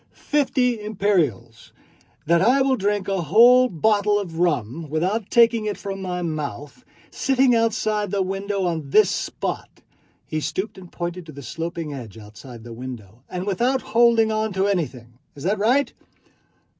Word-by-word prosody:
Fifty 255 -5 0
imperials... 195 - -1 0.5
that 170 +1 +3
I 260 +7 +4
will 265 -1 +2
drink 205 -2 -1
a 195 -2 -1
whole 245 +8 +6
bottle 205 +4 +2
of 170 -5 -5
rum 150 -2 -1
without 185 +8 -1
taking 230 -2 +4
it 205 - -3
from 195 -1 -6
my 180 -1 -3
mouth, 155 - -5 0.3
sitting 265 -1 +2
outside 215 -2 0
the 195 0 0
window 195 +1 -3
on 160 -5 -3
this 210 +5 +5
spot" - - -4 0.6
(he 155 - -3
stooped 190 +6 -4
and 180 -2 -13
pointed 175 0 -5
to - - -9
the 140 -1 -10
sloping 165 +2 -5
ledge 120 -7 -8
outside 110 +2 -12
the 120 0 -9
window) 115 -3 -9
"and 180 +1 -4
without 245 +7 0
holding 230 -1 +4
on 215 -1 -1
to 190 +1 +1
anything. 130 -11 -3 0.2
Is 140 - -10
that 200 +4 0
right?" 250 +7 +2
190 Hz, 155 wpm, -22 LUFS, 155-220 Hz, 0.6 s, whole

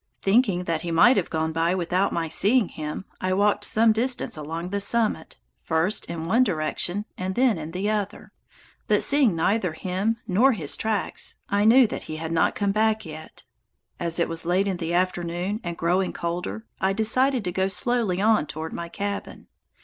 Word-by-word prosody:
Thinking 195 -4 +2
he 165 +1 -2
might 205 +10 +5
have 195 -5 0
gone 160 0 -1
by 165 +2 +1
without 185 +2 0
my 165 -1 -2
seeing 205 +6 +3
him, 155 +4 -6 0.2
I 185 0 0
walked 205 +1 +2
some 225 +2 +4
distance 245 +3 -1
along 165 +3 -5
the 200 +1 -2
summit, 210 -5 0 0.2
first 165 +6 0
in 165 -1 -5
one 230 +9 +3
direction 180 +1 -1
and 185 +1 -3
then 245 -8 +2
in 155 0 -6
the 185 +4 -3
other, 210 -2 -4 0.6
but, - - +3
seeing 280 - +4
neither 185 +1 0
him 190 +7 -2
nor 240 +9 +4
his 160 -10 -1
tracks, 215 -3 -2
I 205 +1 +2
knew 245 +3 +7
that 220 - -4
he 155 - -4
had 160 +1 -5
not 165 - +2
yet - - -29
come 200 -1 0
back. 220 +1 +1 1.0
As 170 -1 -1
it 170 - +2
was 165 0 -3
late 180 +4 +1
in 190 -2 -1
the 165 -1 -4
afternoon, 180 +2 -1
and 170 -2 -5
growing 180 +3 0
colder, 170 - -4
I 190 +1 +1
decided 245 +4 +1
to 180 - -2
go 190 +1 0
slowly 210 -1 0
on 215 -6 +3
toward 160 +1 -6
my 170 0 -5
cabin. 200 +2 -5
185 Hz, 185 wpm, -24 LUFS, 170-215 Hz, 1.0 s, knew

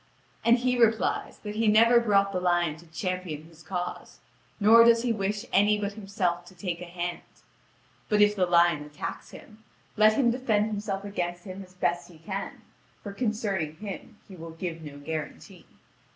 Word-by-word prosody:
And 235 +1 +5
he 250 0 0
replies 225 -1 +1
that 210 -1 -5
he 220 +1 0
never 230 +3 +6
brought 200 -4 +2
the 185 - -1
lion 175 -3 +1
to 170 +1 -16
champion 180 -2 -4
his 165 0 -17
cause, 180 +1 -5 0.4
nor 225 +3 +7
does 230 0 +5
he 240 -2 +1
wish 210 +1 -2
any 210 +2 +4
but 200 0 -3
himself 195 -4 -2
to 185 - -16
take 175 -2 -4
a - - -5
hand: 175 0 -4 0.9
but 210 -2 +2
if 210 0 +5
the 185 -3 +1
lion 170 -3 +4
attacks 150 0 -7
him, 215 0 -14 0.3
let 215 0 +5
him 240 0 +3
defend 230 -4 +1
himself 205 -2 -3
against 175 -3 -4
him 190 0 -8
as 185 0 -18
best 175 -1 -1
he 170 - -15
can, 190 +5 -6 0.4
for 200 - -6
concerning 200 -8 -2
him 205 +3 -8
he 190 - -11
will 165 -1 -9
give 165 0 -6
no 145 -2 -9
guarantee. 155 +1 -7
195 Hz, 180 wpm, -27 LUFS, 175-215 Hz, 0.9 s, nor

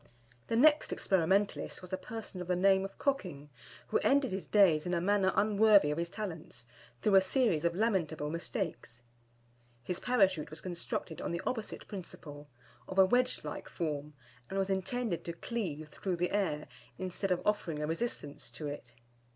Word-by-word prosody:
The - - 0
next 295 +5 +5
experimentalist 190 +2 +1
was 180 +1 -9
a - - +4
person 220 -2 -7
of 180 - -6
the 180 - +2
name 190 +1 +4
of 195 - -7
Cocking, 175 - -2 0.4
who - - +2
ended 275 -1 +3
his 190 -3 -4
days 180 -6 +4
in 175 - 0
a - - +1
manner 190 +1 +3
unworthy 210 -5 +5
his 170 +2 -2
talents, 165 - -7 0.4
through 210 - +3
a 195 - +8
series 190 - +1
of 170 0 +1
lamentable 170 -8 0
mistakes. 165 - -4 0.8
His 180 +7 -3
Parachute 195 -11 +2
was 155 - -7
constructed 170 -2 -4
on - - -3
the 170 +1 -2
opposite 225 -4 -4
principle, 150 -7 -9 0.4
of 185 - -7
a 190 - +8
wedge 250 +6 +2
like - - -6
form, 150 -3 -3 0.3
and 195 - -3
was 195 0 +1
intended 190 +1 -1
to 170 - -3
cleave 170 -7 -4
through 185 +4 -3
the 180 +1 -1
air, 185 -7 0 0.3
instead 185 +1 -3
of 180 - +1
offering 185 -7 0
a 150 - -1
resistance 165 -3 -3
to 155 - -7
it. 145 -5 -7
185 Hz, 170 wpm, -32 LUFS, 160-205 Hz, 0.8 s, a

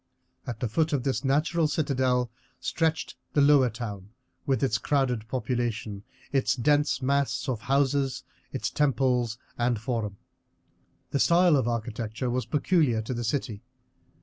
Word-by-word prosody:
At 120 -3 -5
the 125 - +1
foot 155 +7 0
of 135 -4 0
this 135 +1 -1
natural 155 +4 +2
citadel 130 -5 +1 0.3
stretched 160 -1 -1 0.2
the 145 - +4
lower 140 -3 +6
town, 105 -4 -6 0.4
with 135 0 +1
its 110 -4 +2
crowded 125 -6 0
population, 120 -5 -2 0.3
its 135 -2 +2
dense 145 +1 +2
mass 140 +1 0
of 120 -5 -2
houses, 135 +1 +1 0.3
its - - -2
temples 125 -5 +1 0.2
and 120 -2 +1
forum. 110 -3 -3 0.9
The 140 - 0
style 170 0 +5
of 130 -4 +1
architecture 115 +1 -3
was 125 +1 -1
peculiar 150 -8 +2
to 120 - -4
the 120 0 -3
city. 110 -3 -2
130 Hz, 140 wpm, -27 LUFS, 115-140 Hz, 0.9 s, lower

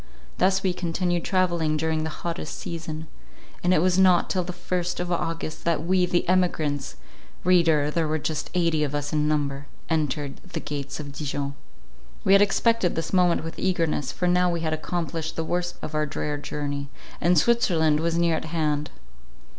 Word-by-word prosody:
Thus 190 +1 +3
we 185 -2 +2
continued 175 0 -1
travelling 170 -5 +1
during 160 0 0
the 160 - -2 0.2
hottest 170 +1 -3
season; 160 -1 -5 0.6
and 180 - +3
it 175 -3 +4
was 185 0 +3
not 185 -2 +5
till 185 -2 +1
the 180 - -5
first 180 0 -2
of 180 0 -2
August, 165 -2 -3
that 165 -1 0
we, 180 0 +3
the 175 0 0
emigrants,—reader, 165 -1 +1
there 165 0 0
were 155 +1 0
just 155 0 -3
eighty 165 -3 +2
of 145 -1 -2
us 145 0 -3
in 150 -1 +2
number,—entered 145 0 -2
the 180 -3 -7
gates 145 -2 -5
of 145 -2 -6
Dijon. 140 -1 -3 0.7
We 195 - +5
had 200 - +7
expected 205 -1 +2
this 165 +2 -3
moment 180 -3 +3
with 165 0 -7
eagerness, 165 -7 0
for 180 - -1
now 180 0 +3
we 170 -1 -2
had 160 -1 0
accomplished 160 0 -3
the 165 - -1
worst 175 +1 -2
part - - -6
of - - -18
our 155 0 +1
drear 150 0 -3
journey, 145 -1 -4 0.3
and 175 +1 +4
Switzerland 165 -8 +3
was 165 +1 0
near 170 -1 +3
at - - -4
hand. 150 -2 -1
165 Hz, 180 wpm, -25 LUFS, 150-180 Hz, 0.7 s, had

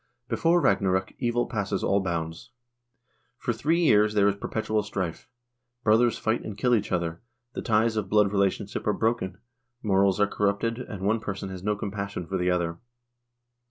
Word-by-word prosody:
Before 170 +6 +3
Ragnarok 95 - +1
evil 120 -1 +1
passes 100 -3 -2
all 100 - +3
bounds. 85 -3 -3 0.9
For - - -1
three 165 +4 +1
years 105 -8 +4
there 100 -1 +4
is 100 - +2
perpetual 110 +1 -1
strife. 100 -5 -4 0.5
Brothers 115 +2 +4
fight 110 +1 0
and 105 -2 -7
kill 125 +3 +2
each 105 -3 +1
other, 85 -2 -1 0.3
the - - -4
ties 110 0 +2
of 100 -3 -2
blood 105 -2 +4
relationship 100 +1 -1
are 105 - +3
broken, 110 -5 -1 0.5
morals 100 -1 +3
are 105 - +5
corrupted, 105 +3 0
and 100 -6 -7
one 110 +3 +2
person 100 -2 -5
has 95 -1 -7
no 105 +2 0
compassion 100 -2 -4
for 95 +3 -2
the 90 0 +1
other. 85 -2 -1
100 Hz, 165 wpm, -26 LUFS, 95-110 Hz, 0.9 s, are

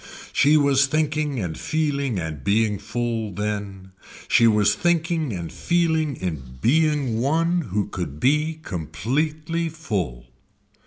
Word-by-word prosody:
She 150 +2 +5
was 140 -1 +4
thinking 150 -2 0
and 85 -6 -3
feeling 140 -7 -1
and 80 -5 -4
being 105 +3 +2
full 115 -3 -2
then. 100 -1 -4 0.4
She 115 - +5
was 105 -1 +4
thinking 165 +1 0
and 85 -5 -5
feeling 160 -4 +1
in 70 - -5
being 145 - +2
one 165 +7 +2
who 100 +1 0
could 80 -6 -5
be 150 - +2
completely 150 - -2
full. 100 - -4
125 Hz, 120 wpm, -23 LUFS, 100-155 Hz, 0.4 s, She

